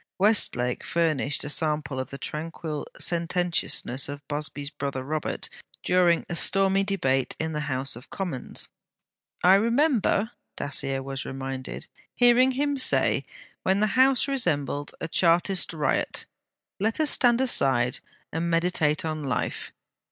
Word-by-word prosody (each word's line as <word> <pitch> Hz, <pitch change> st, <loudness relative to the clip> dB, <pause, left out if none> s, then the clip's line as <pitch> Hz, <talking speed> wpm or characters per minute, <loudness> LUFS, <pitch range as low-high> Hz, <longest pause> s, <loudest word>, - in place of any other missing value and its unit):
Westlake 185 Hz, -, +2 dB
furnished 155 Hz, -4 st, 0 dB
a 145 Hz, -, -4 dB
sample 150 Hz, -3 st, 0 dB
of 130 Hz, -, -4 dB
the 140 Hz, -, -7 dB
tranquil 155 Hz, 0 st, -5 dB
sententiousness 170 Hz, -6 st, 0 dB
of 145 Hz, 0 st, -8 dB
Busby's 145 Hz, -1 st, -2 dB
brother 135 Hz, -2 st, -4 dB
Robert 155 Hz, +2 st, -2 dB, 0.4 s
during 180 Hz, -2 st, +3 dB
a -, -, -4 dB
stormy 195 Hz, +2 st, +3 dB
debate 135 Hz, -10 st, 0 dB
in 160 Hz, 0 st, -2 dB
the 150 Hz, -, -2 dB
House 130 Hz, -1 st, -2 dB
of 120 Hz, -, -12 dB
Commons. 175 Hz, -10 st, -4 dB, 0.8 s
'I 185 Hz, -, +7 dB
remember,' 230 Hz, 0 st, +2 dB, 0.3 s
Dacier 135 Hz, -1 st, -1 dB
was 135 Hz, 0 st, -4 dB
reminded, 135 Hz, -1 st, -6 dB, 0.3 s
'hearing 245 Hz, +2 st, +5 dB
him 285 Hz, +2 st, 0 dB
say, 260 Hz, -, +2 dB, 0.4 s
when 190 Hz, +1 st, +1 dB
the 215 Hz, -1 st, +1 dB
House 260 Hz, 0 st, +4 dB
resembled 145 Hz, -, -2 dB
a 165 Hz, -, -3 dB
Chartist 175 Hz, +3 st, +3 dB
riot, 155 Hz, -3 st, -1 dB, 0.5 s
"Let 220 Hz, +6 st, 0 dB
us 310 Hz, -1 st, +5 dB
stand 240 Hz, -1 st, +4 dB
aside 135 Hz, -, +2 dB, 0.3 s
and 165 Hz, +2 st, -1 dB
meditate 165 Hz, -3 st, +1 dB
on 155 Hz, -1 st, -3 dB
Life. 130 Hz, -, -3 dB
165 Hz, 130 wpm, -26 LUFS, 140-195 Hz, 0.8 s, I